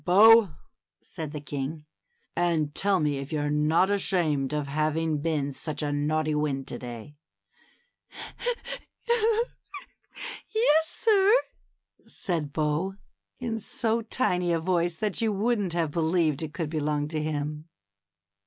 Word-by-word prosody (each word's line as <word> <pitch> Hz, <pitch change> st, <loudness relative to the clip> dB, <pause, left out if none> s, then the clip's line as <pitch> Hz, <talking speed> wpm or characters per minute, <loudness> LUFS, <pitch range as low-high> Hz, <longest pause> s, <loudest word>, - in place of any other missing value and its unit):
Bo! 205 Hz, -1 st, +7 dB, 0.2 s
" -, -, -64 dB
said 155 Hz, -3 st, -6 dB
the 150 Hz, -, -5 dB
king, 145 Hz, +1 st, -5 dB, 0.5 s
and 165 Hz, -4 st, +1 dB
tell 195 Hz, +3 st, +2 dB
me 145 Hz, -2 st, 0 dB
if 140 Hz, 0 st, -7 dB
you're 145 Hz, -1 st, -1 dB
not 155 Hz, +6 st, +3 dB
ashamed 165 Hz, -9 st, +1 dB
of 150 Hz, -1 st, -1 dB
having 155 Hz, +2 st, 0 dB
been 150 Hz, -2 st, -1 dB
such 150 Hz, +2 st, -4 dB
a 145 Hz, -, -1 dB
naughty 155 Hz, +1 st, 0 dB
wind 145 Hz, -3 st, -1 dB
to -, -, -5 dB
day?" 120 Hz, +4 st, -9 dB, 1.9 s
^^Yes, 460 Hz, 0 st, +2 dB, 1.3 s
sir," 405 Hz, +2 st, +3 dB, 0.7 s
said 160 Hz, -6 st, -3 dB
Bo, 155 Hz, +5 st, -1 dB, 0.4 s
in 235 Hz, -3 st, -3 dB
so 230 Hz, +2 st, 0 dB
tiny 180 Hz, -6 st, 0 dB
a 165 Hz, -, +2 dB
voice 175 Hz, 0 st, 0 dB
that 210 Hz, +4 st, -1 dB
you 225 Hz, -1 st, +2 dB
wouldn't 205 Hz, -3 st, 0 dB
have 165 Hz, -3 st, 0 dB
believed 160 Hz, -2 st, +1 dB
it 155 Hz, -2 st, -4 dB
could 160 Hz, -2 st, -4 dB
belong 150 Hz, -2 st, -1 dB
to 155 Hz, -1 st, -2 dB
him. 150 Hz, +1 st, -3 dB
160 Hz, 130 wpm, -27 LUFS, 150-190 Hz, 1.9 s, Bo